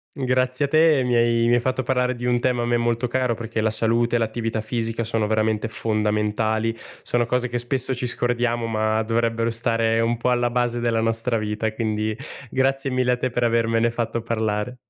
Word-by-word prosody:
Grazie 130 +1 0
a - - -11
te, 155 -2 +4
mi 125 -1 0
hai 115 0 +3
mi 120 - +4
hai 120 - +3
fatto 130 +1 -1
parlare 125 0 0
di 120 0 -5
un 125 0 +2
tema 120 -1 0
a - - -1
me 120 0 +2
molto 120 +1 0
caro, 125 -1 0
perché 115 -1 -4
la 110 - +2
salute, 115 +2 +2
l'attività 115 0 -2
fisica 115 +1 -2
sono 115 -1 0
veramente 110 0 0
fondamentali. 110 +1 0 0.3
Sono 120 -1 0
cose 125 +1 -1
che 120 - -4
spesso 130 +2 -1
ci 125 0 -3
scordiamo 120 -1 0
ma 110 0 0
dovrebbero 115 0 0
stare 115 0 +1
un 115 +1 0
po' 120 - -1
alla 120 -1 +2
base 120 0 0
della 115 -1 +1
nostra 115 +1 0
vita 105 +1 -2
e 110 - -1
quindi 110 -1 -1 0.4
grazie 135 +1 +1
mille 125 -1 +1
a - - +2
te 130 +1 -2
per 120 0 -1
avermene 115 0 +2
fatto 115 0 -2
parlare. 110 +1 -2
115 Hz, 200 wpm, -23 LUFS, 115-125 Hz, 0.4 s, te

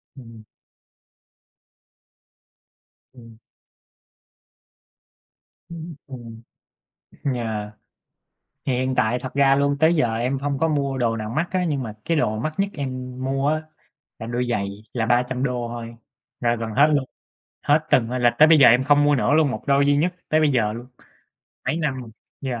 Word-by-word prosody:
Ừm. 115 -4 -13 2.7
Ừm. 115 -3 -15 2.3
Ưm, 165 -1 -8
ừm. 120 -4 -10 0.9
Yeah. 110 -3 -3 1.0
Thì 135 - 0
hiện 130 +1 -1
tại 125 0 +1
thật 130 +1 -7
ra 135 -1 +4
luôn, 140 0 +1
tới 160 +2 +4
giờ 120 -7 +1
em 125 +4 -1
hông 140 0 -2
có 160 +4 +1
mua 140 -3 -1
đồ 115 -2 0
nào 110 0 -5
mắc 160 +9 -1
á, 185 -1 0
nhưng 140 -4 -1
mà 110 -3 -6
cái 165 -2 +1
đồ 110 -7 0
mắc 155 +7 -3
nhất 195 0 +1
em 130 -3 -5
mua 135 +1 0
á 155 +1 0 0.6
là 115 - -7
đôi 120 +1 -2
giày 100 -4 -1 0.2
là 115 -2 -1
$300 125 0 0
thôi, 115 0 -7 0.4
là 120 -1 +1
gần 115 0 -4
hết 140 +7 +5
luôn, 140 -2 +1 0.6
hết 145 +1 +5
từng 115 -2 +3
là 125 -1 +3
tới 155 +1 +8
bây 160 - +6
giờ 135 - +8
em 125 +3 +4
không 145 0 +4
mua 145 0 +4
nữa 140 +2 +2
luôn, 155 -3 +3
một - - -5
đôi 140 0 +3
duy 145 0 +3
nhất 175 +5 +1
tới 155 - +3
bây 155 -2 +3
giờ 110 -4 +1
luôn, 120 +3 -8 0.8
mấy 155 - 0
năm 150 -5 -1
rồi, 115 - -11 0.3
yeah. 125 -4 -3
130 Hz, 165 wpm, -23 LUFS, 120-145 Hz, 2.7 s, tới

